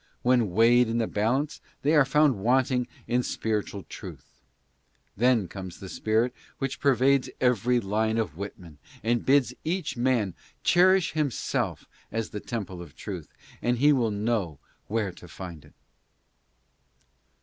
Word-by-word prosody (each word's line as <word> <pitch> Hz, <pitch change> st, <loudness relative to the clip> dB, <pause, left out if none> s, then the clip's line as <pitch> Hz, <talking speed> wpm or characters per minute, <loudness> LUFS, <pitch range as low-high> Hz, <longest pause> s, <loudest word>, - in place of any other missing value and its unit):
When 120 Hz, -4 st, +3 dB
weighed 115 Hz, +5 st, +5 dB
in 115 Hz, -, 0 dB
the 115 Hz, -, +2 dB
balance 130 Hz, +9 st, -1 dB, 0.2 s
they 150 Hz, +3 st, +3 dB
are 145 Hz, -3 st, +6 dB
found 140 Hz, -4 st, +3 dB
wanting 125 Hz, +3 st, +2 dB, 0.2 s
in 125 Hz, +1 st, +2 dB
spiritual 105 Hz, -4 st, -2 dB
truth. -, -, -11 dB, 0.7 s
Then 120 Hz, -3 st, +3 dB
comes 95 Hz, -2 st, -8 dB
the 95 Hz, -2 st, -8 dB
spirit 110 Hz, +5 st, +1 dB, 0.2 s
which 135 Hz, 0 st, -3 dB
pervades 135 Hz, 0 st, +3 dB
every 125 Hz, 0 st, +3 dB
line 110 Hz, +1 st, 0 dB
of 105 Hz, -10 st, -1 dB
Whitman 90 Hz, -5 st, -8 dB, 0.2 s
and 120 Hz, +1 st, +1 dB
bids 135 Hz, -1 st, +3 dB
each 180 Hz, +3 st, -2 dB
man 120 Hz, -6 st, +1 dB, 0.3 s
cherish 185 Hz, 0 st, +4 dB
himself 150 Hz, -7 st, -1 dB, 0.3 s
as 115 Hz, -1 st, -3 dB
the 105 Hz, -, -4 dB
temple 100 Hz, -6 st, -5 dB
of 85 Hz, -6 st, -12 dB
truth, -, -, -7 dB, 0.3 s
and 120 Hz, 0 st, +1 dB
he 145 Hz, +4 st, +5 dB
will 120 Hz, -5 st, +2 dB
know 105 Hz, -6 st, -1 dB, 0.3 s
where 105 Hz, -3 st, -1 dB
to 90 Hz, -, -14 dB
find 85 Hz, -3 st, -9 dB
it. -, -, -20 dB
115 Hz, 140 wpm, -27 LUFS, 100-130 Hz, 0.7 s, are